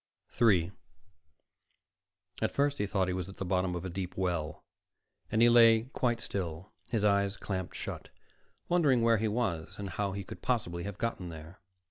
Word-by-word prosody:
3 95 -7 +3 1.7
At - - +2
first 145 0 0
he 105 - 0
thought 95 -2 +1
he 90 - -1
was 90 0 -3
at 95 - -11
the 95 - -3
bottom 90 0 0
of 90 +1 -4
a - - -3
deep 90 0 -5
well 85 -5 -2 0.7
and 110 +2 +4
he - - +8
lay 115 -1 +7
quite 120 -2 0
still, 90 -2 -5 0.2
his 110 -4 0
eyes 100 -1 +2
clamped 95 -3 -4
shut, - - -6 0.6
wondering 145 -9 +3
where 115 -1 +5
he 110 +1 0
was 105 -8 -2
and 100 -2 -5
how 100 +1 -2
he 100 0 -4
could - - -10
possibly 85 -8 -1
have 100 -2 -5
gotten 105 -6 -3
there. 80 +3 -10
100 Hz, 175 wpm, -31 LUFS, 90-115 Hz, 1.7 s, he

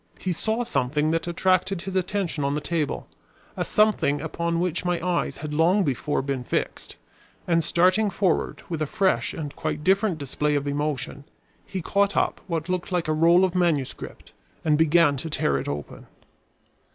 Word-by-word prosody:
He 185 - -2
saw 220 +8 -1
something 150 - 0
that 165 +1 -1
attracted 185 +1 +1
his 190 -1 -5
attention 185 -4 -1
on 140 +1 0
the - - 0
table, 155 -1 -2 0.5
a - - -1
something 210 -9 +2
upon 170 +2 -2
which 175 -1 -1
my 175 -1 0
eyes 170 -6 0
had 150 0 -6
long 175 +6 +3
before 140 -1 -1
been 135 -2 -2
fixed, - - -3 0.5
and 165 -2 +3
starting 185 +6 +3
forward 185 -2 0
with 165 -3 -4
a 155 - 0
fresh 195 +2 +1
and 150 -4 -6
quite 155 -1 -3
different 195 0 +2
display 150 +1 -1
of 145 -1 0
emotion, 145 -1 -2 0.4
he 190 -3 -4
caught 200 +2 +1
up - - +1
what 165 -3 -2
looked 180 0 -2
like 175 -3 0
a 155 - +1
roll 170 +4 +5
of 185 - -2
manuscript 170 -7 -1 0.3
and 155 -1 +4
began 160 -1 +4
to 160 +5 -4
tear 70 - +1
it - - -6
open. 70 0 -6
165 Hz, 175 wpm, -25 LUFS, 150-185 Hz, 0.5 s, roll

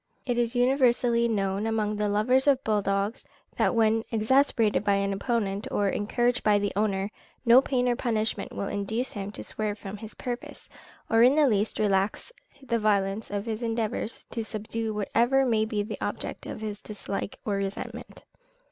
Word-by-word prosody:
It 245 -2 0
is 235 +1 0
universally 245 -2 +3
known 200 -1 0
amongst 215 -1 -1
the 210 0 +1
lovers 250 +7 +2
of 270 -1 +4
bull 215 -1 +1
dogs, 200 +3 -1 0.3
that - - +2
when 225 -1 +4
once 225 - -5
exasperated 225 -1 +2
by 200 -1 +3
an 200 0 0
opponent 200 -1 -1
or 205 -1 +1
encouraged 240 +5 0
by 210 -1 +4
the 205 0 -1
owner, 200 -1 0 0.3
no 240 +2 +8
pain 250 -2 0
or 245 - +2
punishment 225 -3 -1
will 200 - -4
induce 220 +6 -2
him 200 -1 -5
to - - -6
swerve 215 -1 -3
from 200 -1 -7
his 220 +1 -10
purpose, 245 -1 -6 0.4
or 225 0 +4
in 255 +4 +6
the 305 -1 +5
least 210 -2 +1
relax 200 - 0 0.3
the 235 -3 0
violence 205 0 +1
of 205 0 -3
his 225 0 -3
endeavours 225 -1 -2
to 230 - -3
subdue 220 +1 -3
whatever 235 +6 +2
may 220 -3 +2
be 215 -2 -1
the 210 - -7
object - - -4
of - - -6
his 210 -1 -5
dislike 200 -1 -5
or 205 -2 0
resentment. 195 0 -5
220 Hz, 180 wpm, -27 LUFS, 205-240 Hz, 0.4 s, no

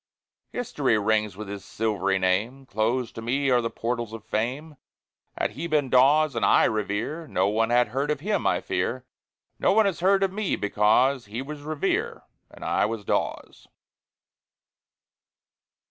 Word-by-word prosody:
History 145 - 0
rings 105 -2 0
with 105 -1 -7
his 100 -1 -7
silvery 100 -2 -1
name; 105 +9 0
Closed 115 +2 -1
to 115 - -7
me 135 +4 0
are 125 -1 +4
the 115 - -2
portals 120 -1 -3
of 115 -1 -8
fame. 135 +8 -3 0.6
Had - - 0
he 170 - -5
been 150 -5 0
Dawes 145 +4 +5
and 115 - -1
I - - +5
Revere, 110 +9 -2
No 95 -5 +1
one 110 +2 +1
had 120 0 +3
heard 140 +3 -2
of 150 - 0
him, 205 +7 -1
I - - +1
fear. - - -2 0.5
No - - +3
one 220 +1 +4
has 195 -4 -1
heard 195 +2 +3
of 190 -1 0
me 210 -1 -1
because 110 +6 +2
He 115 +5 -5
was 150 +1 -8
Revere 155 0 -2 0.3
and - - -11
I - - +1
was 110 -2 -5
Dawes. - - -3
120 Hz, 160 wpm, -25 LUFS, 110-150 Hz, 0.6 s, Dawes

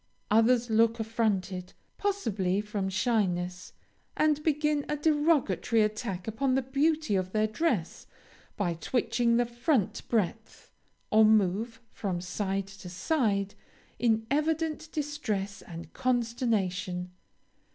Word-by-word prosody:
Others 230 +2 +4
look 230 +1 +3
affronted, 200 -5 -1 0.3
possibly 215 - 0
from 210 -2 -2
shyness, 185 -3 -1 0.4
and 305 -1 +3
begin 300 -1 +1
a 300 - 0
derogatory 295 - +2
attack 210 -3 -3
upon 255 +4 0
the 265 - +1
beauty 290 -1 +1
of 185 -1 -1
their 215 0 +3
dress 215 - -1 0.5
by 185 -5 0
twitching 235 +5 +1
the 240 - +3
front 240 - 0
breadth 220 0 -2 0.4
or 220 +1 +6
move 215 +2 +2
from 185 -4 -3
side 195 +2 -2
to 195 -2 -11
side, 200 - 0 0.5
in 225 -2 +2
evident 315 +1 0
distress 225 -10 -3
and 165 -2 -10
consternation. 210 -7 -1
220 Hz, 110 wpm, -29 LUFS, 195-265 Hz, 0.5 s, or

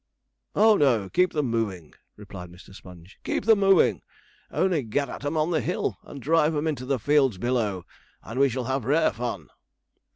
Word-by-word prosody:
'Oh 215 +1 +5
no, 120 -9 +2
keep 180 0 +2
them 145 -6 -1
moving,' 100 -9 -3 0.2
replied 95 -4 -10
Mr. 90 +2 -15
Sponge, 90 +1 -14
'keep - - -2
them 220 -2 +5
moving. 195 -1 +4 0.5
Only 180 -5 +1
get 130 +4 -2
at - - -8
'em 145 +3 -2
on 155 +3 +1
the 160 - +1
hill, - - -2
and 140 - -11
drive 155 +3 +2
'em 150 +1 -1
into 140 -5 -3
the 135 -1 +1
fields 135 -3 +2
below, 105 -5 -1 0.4
and 115 +5 -6
we 140 0 +4
shall 130 +1 -3
have 130 +1 -2
rare 155 +5 +2
fun.' 115 -8 -5
130 Hz, 185 wpm, -25 LUFS, 105-155 Hz, 0.5 s, Oh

